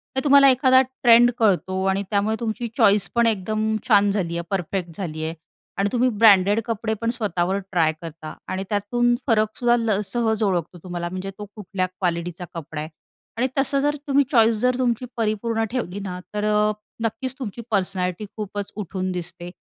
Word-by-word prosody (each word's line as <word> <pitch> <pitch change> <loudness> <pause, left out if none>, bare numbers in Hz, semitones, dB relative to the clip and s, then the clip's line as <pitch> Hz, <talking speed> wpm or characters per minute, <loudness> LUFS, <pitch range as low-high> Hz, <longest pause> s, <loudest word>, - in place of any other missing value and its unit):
तर 265 - 0
तुम्हाला 280 -1 +7
एखादा 260 0 +5
ट्रेंड 245 -2 +4
कळतो 190 -3 +1
आणि 195 +1 0
त्यामुळे 210 +1 +1
तुमची 230 0 -3
चॉईस 205 -5 +5
पण 235 0 +4
एकदम 215 +1 0
छान 205 -4 +5
झाली 175 -4 -2
आहे. 170 - -3
परफेक्ट 180 -2 -3
झाली 160 -5 -4
आहे 160 +1 -3 0.4
आणि 195 +1 +1
तुम्ही 250 +1 +2
ब्रँडेड 205 0 +6
कपडे 225 -1 -2
पण 230 - 0
स्वतःवर 190 -3 0
ट्राय 165 -4 +2
करता 160 -1 -8
आणि 190 +1 -3
त्यातून 240 +4 +1
फरक 220 -2 +2
सुद्धा 240 -1 +3
ल 220 -3 +1
सहज 220 +1 0
ओळखतो 180 -3 -1
तुम्हाला 175 -1 -4
म्हणजे 185 +2 -5
तो 210 - -7
कुठल्या 195 -3 -3
क्वालिटीचा 175 -1 -3
कपडा 160 -2 -6
आहे. 155 - -6 0.5
आणि 250 +3 +2
तसं 275 +1 +2
जर 295 +1 +1
तुम्ही 280 0 +4
चॉईस 230 -3 +5
जर 250 0 +2
तुमची 245 -1 0
परिपूर्ण 225 0 -1
ठेवली 205 -7 -3
ना, 185 -2 -5
तर 210 0 -2
अ, 210 0 +2 0.3
नक्कीच 230 +4 -2
तुमची 235 -2 -6
पर्सनॅलिटी 185 -1 -1
खूपच 205 -1 -5
उठून 185 -2 -3
दिसते 175 0 -5
205 Hz, 175 wpm, -23 LUFS, 185-230 Hz, 0.5 s, तुम्हाला